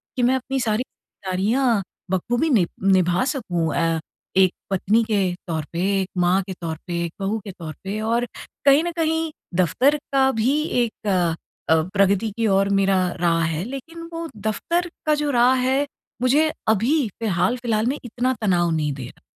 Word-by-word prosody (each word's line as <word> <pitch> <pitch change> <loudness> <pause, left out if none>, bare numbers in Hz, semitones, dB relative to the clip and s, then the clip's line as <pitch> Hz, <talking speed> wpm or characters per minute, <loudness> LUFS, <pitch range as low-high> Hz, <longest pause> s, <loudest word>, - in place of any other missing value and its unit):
कि 250 - 0
मैं 250 +2 +4
अपनी 265 +1 -2
सारी 225 -1 0
जिम्मेदारियाँ 215 +3 -1 0.3
बखूबी 240 - +1
निभ 205 - +3 0.2
निभा 180 +2 +3
सकूँ 180 - -1
अ, 165 -1 +1 0.4
एक 185 -1 +5 0.2
पत्नी 205 +4 +2
के 215 -3 +1 0.2
तौर 160 -3 -2
पे, 170 - -2 0.2
एक 190 - -4
माँ 180 +2 +3
के 190 - -4
तौर 160 -2 -3
पे, 170 -1 -2
एक 165 - -6
बहू 205 +3 -1
के 200 - -5
तौर 165 -4 -8
पे? 200 +2 -3
और 230 +2 +1 0.4
कहीं 280 +3 +6
न 345 - -2
कहीं, 320 0 0 0.2
दफ़्तर 215 - +3 0.2
का 265 -1 +4
भी 275 +6 +2 0.2
एक 220 -2 -6 0.6
अ, 160 0 +5
प्रगति 200 +2 +3
की 225 -1 +1
ओर 195 0 +3
मेरा 195 -1 +3 0.2
राह 165 -1 +3
है, 165 0 -1
लेकिन 275 +7 -7
वो 330 0 -4
दफ़्तर 335 - -1 0.2
का 305 - +4
जो 295 -1 -1
राह 245 0 +5
है, 270 +2 +2 0.4
मुझे 295 +5 +3 0.2
अभी 235 +6 +2
फ़िलहाल-फ़िलहाल 220 +3 0
में 275 +4 0
इतना 245 +2 -1
तनाव 175 -5 +2
नहीं 150 -3 0
दे 135 -2 -7
रहा। - - -16
215 Hz, 175 wpm, -22 LUFS, 180-260 Hz, 0.6 s, कहीं